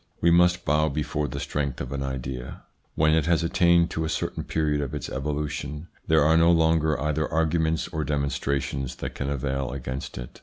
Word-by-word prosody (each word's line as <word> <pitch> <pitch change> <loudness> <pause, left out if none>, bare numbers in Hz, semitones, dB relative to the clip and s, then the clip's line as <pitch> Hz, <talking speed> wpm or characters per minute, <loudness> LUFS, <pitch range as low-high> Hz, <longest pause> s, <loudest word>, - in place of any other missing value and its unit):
We 85 - +4
must 90 +1 +4
bow 75 +2 +2
before 75 0 -2
the - - -5
strength 70 -3 -2
of 65 - -5
an 70 0 -3
idea. 65 -2 -5 0.3
When 80 0 +3
it 80 -1 +2
has 85 -1 +2
attained 85 0 +3
to 80 - -2
a 80 - -2
certain 80 - -2
period 75 -2 0
of 70 -3 -4
its - - -5
evolution, 75 +2 -4 0.2
there 80 -2 +4
are 80 +2 +4
no 85 +1 +5
longer 80 -2 +3
either 75 0 -1
arguments 80 0 +1
or 80 -3 -2
demonstrations 70 -2 -2
that - - -5
can 70 - -3
avail 70 -1 -2
against 65 0 -5
it. - - -8
75 Hz, 190 wpm, -25 LUFS, 70-80 Hz, 0.3 s, no